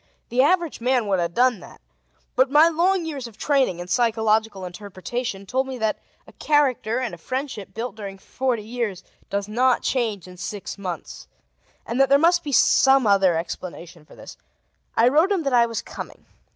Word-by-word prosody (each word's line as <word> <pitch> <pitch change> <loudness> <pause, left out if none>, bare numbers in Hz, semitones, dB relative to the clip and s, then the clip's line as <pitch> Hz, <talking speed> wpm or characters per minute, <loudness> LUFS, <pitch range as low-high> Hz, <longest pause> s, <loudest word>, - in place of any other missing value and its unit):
The 250 +2 +2
average 340 -1 +1
man 250 -1 +1
would 195 -2 +1
have 170 0 -2
done 250 -3 +3
that, - - -14 0.6
but 260 +1 +3
my 300 +3 +6
long 345 +2 +1
years 280 -6 -5
of 220 -2 -15
training 270 - +1
in 175 0 -7
psychological 220 -2 +1
interpretation 200 +3 -5
told 260 +6 -1
me 260 -1 -5
that 220 -2 -1 0.3
a - - -16
character 265 -6 +1
and 245 -6 -3
a 170 - -9
friendship 255 - -5
built 225 -1 -5
during 200 -2 -7
forty 245 +3 -2
years 220 -5 -4 0.3
does 200 0 -2
not 245 +4 +2
change 215 -8 -1
in 180 0 -12
six 200 +2 -6
months, 180 -3 -7 0.6
and 245 +3 0
that 270 - +4
there 280 - +6
must 345 +3 +3
be 290 - -4
some 270 -1 +5
other 195 -4 +4
explanation 170 0 -7
for 150 - -17
this. - - -12 0.6
I 230 - +5
wrote 315 +9 +3
him 375 -5 +1
that 275 -2 -1
I 235 -1 +5
was 230 -1 -4
coming. - - -9
235 Hz, 185 wpm, -23 LUFS, 195-265 Hz, 0.6 s, my